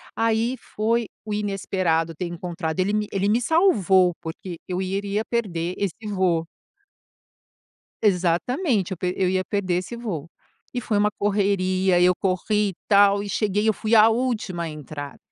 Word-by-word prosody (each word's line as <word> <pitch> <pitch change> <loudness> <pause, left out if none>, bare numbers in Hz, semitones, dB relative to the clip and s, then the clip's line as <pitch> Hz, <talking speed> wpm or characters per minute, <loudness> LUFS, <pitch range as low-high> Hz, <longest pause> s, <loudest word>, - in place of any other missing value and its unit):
aí 225 +2 +1
foi 230 0 -1 0.2
o 215 - -3
inesperado 185 -5 0
ter 180 - -3
encontrado 170 -1 -4
ele 190 +3 +1
me 210 0 0
ele 195 +1 0
me 230 +3 +2
salvou 200 - +4
porque 170 +2 -7
eu 180 0 -2
iria 200 +3 -2
perder 180 -7 -2
esse 200 +1 -3
voo. 175 -4 +1 1.6
Exatamente 200 - +1
eu 190 - -3
pe 180 +1 -1
eu 185 -1 +2
ia 185 0 +1
perder 185 -2 -1
esse 180 +6 -3
voo. 185 -10 -5 0.4
E 245 - -1
foi 215 -2 0
uma 210 +1 +3
correria 190 -3 +2
e 180 - +5
eu 180 - +5
corri 200 +3 0
e 190 - -8
tal 200 0 +5
e 205 - -6
cheguei 210 +1 0
eu 220 - +4
fui 220 +3 0
à 220 0 +8
última 220 -8 -1
entrar. 145 -1 -8
195 Hz, 160 wpm, -23 LUFS, 180-215 Hz, 1.6 s, à